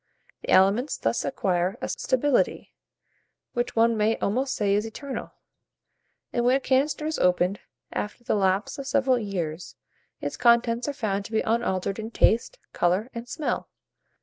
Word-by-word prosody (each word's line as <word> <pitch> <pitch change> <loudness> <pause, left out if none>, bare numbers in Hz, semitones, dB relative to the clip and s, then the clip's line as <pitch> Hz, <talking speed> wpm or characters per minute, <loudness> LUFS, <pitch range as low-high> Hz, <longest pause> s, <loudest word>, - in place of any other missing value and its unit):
The - - -9
aliments 200 +9 +4
thus 115 +1 0
acquire 180 +5 0
a - - -3
stability, 260 +1 0 0.8
which 240 0 -2
one 230 0 +4
may 215 +1 +2
almost 260 +6 -1
say 200 -2 +1
is 205 +1 +2
eternal; 260 +5 -6 1.0
and 240 - +1
when 250 +2 +4
a - - -4
canister 275 +3 +1
is 315 0 -2
opened, 180 +2 +2 0.3
after 210 +3 -4
the - - 0
lapse 195 +6 +1
of 275 - -6
several 260 -2 +2
years, 180 -6 -4 0.4
its - - -4
contents 235 0 +3
are 290 - -1
found 205 -7 -2
to - - -9
be 220 - +2
unaltered 195 -3 -1
in 220 +1 -5
taste, 235 - +2 0.2
colour, 185 +8 +1
and 235 +1 -7
smell. 305 - -2
225 Hz, 155 wpm, -26 LUFS, 195-255 Hz, 1.0 s, aliments